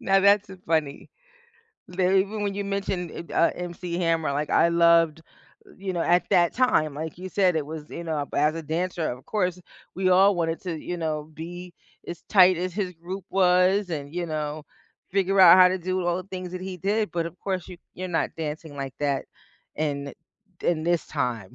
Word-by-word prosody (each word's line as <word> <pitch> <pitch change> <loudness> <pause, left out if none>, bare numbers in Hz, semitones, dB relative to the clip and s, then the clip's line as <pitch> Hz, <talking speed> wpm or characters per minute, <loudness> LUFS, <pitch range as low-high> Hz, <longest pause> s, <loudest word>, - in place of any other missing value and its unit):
Now 195 0 +3
that's 200 0 +4
a 190 - -9
funny. 155 -3 -1 0.8
They 185 +1 +2
even 205 +2 -2
when 200 -1 -1
you 200 0 -3
mentioned, 195 -3 -3 0.2
eh - - -7
uh 170 - +3
MC 175 0 -5
Hammer, 165 -4 +1
like, 145 +2 -2
I 170 - +4
loved 170 -2 +4 0.6
you 190 -1 -4
know, 170 - -1
at 175 +2 +3
that 175 -3 +4
time, 155 - +2
like 160 +2 -6
you 185 +1 -6
said, 185 -3 +2
it 155 - 0
was, 155 0 -7
you 170 - -7
know, 155 -3 -2
as 150 +2 +2
a 165 - -5
dancer, 165 +1 -2
of 125 +1 -9
course, 180 -4 -1 0.4
we 185 0 +1
all 190 +2 +6
wanted 165 -1 -1
to, 180 -3 -3
you 175 - -4
know, 155 -2 -3
be 175 +2 -8 0.4
as 175 - -7
tight 185 -3 +6
as 180 +1 -3
his 185 -2 -3
group 180 +3 -7
was 185 +1 +3
and, 145 -3 -5
you 175 -1 -1
know, 155 -1 -4 0.5
figure 195 0 +1
out 185 -1 +9
how 185 - +9
to 185 - 0
do 185 +1 -2
all 175 0 0
the 185 0 -7
things 185 -2 -6
that 185 - -5
he 185 -1 -6
did, 205 +2 0
but 170 -1 -1
of 170 - -14
course 190 -3 -3
you 180 -2 -10 0.2
you're 185 +1 -5
not 170 -2 0
dancing 155 -1 -5
like 135 -2 -5
that, 140 -2 -1 0.5
in 140 -2 -3 0.5
in 160 -2 +1
this 175 0 +1
time. 120 -9 -3
175 Hz, 205 wpm, -25 LUFS, 160-185 Hz, 0.8 s, out